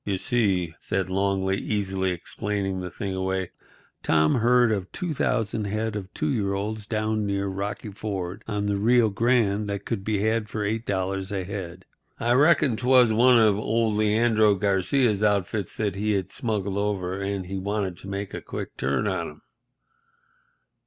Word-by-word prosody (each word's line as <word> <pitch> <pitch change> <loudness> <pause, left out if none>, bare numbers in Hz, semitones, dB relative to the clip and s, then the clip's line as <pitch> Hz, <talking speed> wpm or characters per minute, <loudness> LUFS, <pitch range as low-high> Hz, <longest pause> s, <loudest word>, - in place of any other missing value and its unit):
"You 100 -2 -1
see," 95 - 0
said 95 -1 -2
Longley, 95 0 +1
easily 95 -3 -1
explaining 95 +2 -3
the 90 0 -5
thing 95 +2 -4
away, 95 -1 -2 0.5
"Tom 75 -1 +3
heard 120 0 +4
of 95 -3 -2
2000 115 - -1
head 110 +2 -2
of 95 -2 -6
two 155 - -1
year 100 -6 0
olds 105 +1 -4
down 110 -1 -1
near 100 0 -1
Rocky 100 +2 -4
Ford 95 -3 -5
on 105 -2 -2
the 100 -1 0
Rio 115 +1 +4
Grande 110 -2 +1
that 100 0 -4
could 110 -5 -3
be 105 -1 0
had 110 0 0
for 105 -2 -2
$8 95 -3 -2
a 95 -2 -2
head. 90 -2 -7 0.3
I 120 - 0
reckon 145 -1 +4
'twas 125 -2 +5
one 125 +2 +6
of 105 -3 +4
old 110 0 +1
Leandro 110 0 +3
Garcia's 100 +3 +1
outfits 100 -1 0
that 105 -3 -1
he 105 +2 0
had 95 -2 -2
smuggled 100 -4 -2
over, 100 -2 -2
and 100 -1 -2
he 95 +1 -4
wanted 100 -1 -2
to - - -9
make 100 0 -4
a - - -5
quick - - -6
turn 65 -1 0
on - - -2
'em. 75 0 -15
100 Hz, 165 wpm, -25 LUFS, 95-110 Hz, 0.5 s, one